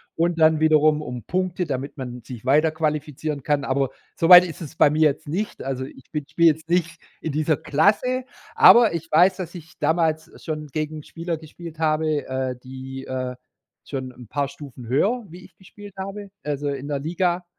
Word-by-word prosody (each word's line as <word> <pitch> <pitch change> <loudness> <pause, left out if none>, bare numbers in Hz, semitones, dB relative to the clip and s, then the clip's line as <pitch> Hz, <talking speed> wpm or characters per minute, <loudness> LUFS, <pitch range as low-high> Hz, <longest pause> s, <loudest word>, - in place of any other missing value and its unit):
und 170 0 0
dann 155 0 +5
wiederum 155 -1 +4
um 125 -5 -6
Punkte, 180 -1 -1
damit 140 +1 -4
man 125 -2 -6
sich 120 0 -10
weiterqualifizieren 150 0 0
kann. 145 +1 0
Aber 135 0 0 0.3
so 165 - +1
weit 180 0 +11
ist 170 0 -8
es 160 -2 -8
bei 145 - +5
mir 155 +1 0
jetzt 150 0 +2
nicht. 190 +8 -3
Also, 130 -1 -3
ich 135 -1 -13
bin 150 -2 -3
spielw 170 - +2
jetzt 160 +2 -3
nicht 170 -1 0 0.2
in 160 - -4
dieser 155 0 +1
Klasse, 230 - +1 0.3
aber 235 -5 +7
ich 165 0 -5
weiß, 180 +4 +5
dass 185 -2 -6
ich 165 -2 -12
damals 160 0 +1
schon 155 -2 -4
gegen 155 +2 -4
Spieler 165 +2 -5
gespielt 160 +1 -11
habe, 155 -1 0
äh, 130 -1 -2
die, 130 +1 -8
äh, 130 -1 -4 0.5
schon 130 -2 -5
'n 125 -2 -13
paar 140 +4 -1
Stufen 140 -4 -11
höher, 210 - +1
wie 175 +3 -12
ich 180 - -19
gespielt 200 +1 -13
habe, 195 +1 -6
also, 145 -1 -2
in 140 0 -4
der 145 -1 -2
Liga. 175 +3 -1
155 Hz, 190 wpm, -23 LUFS, 140-170 Hz, 0.5 s, weit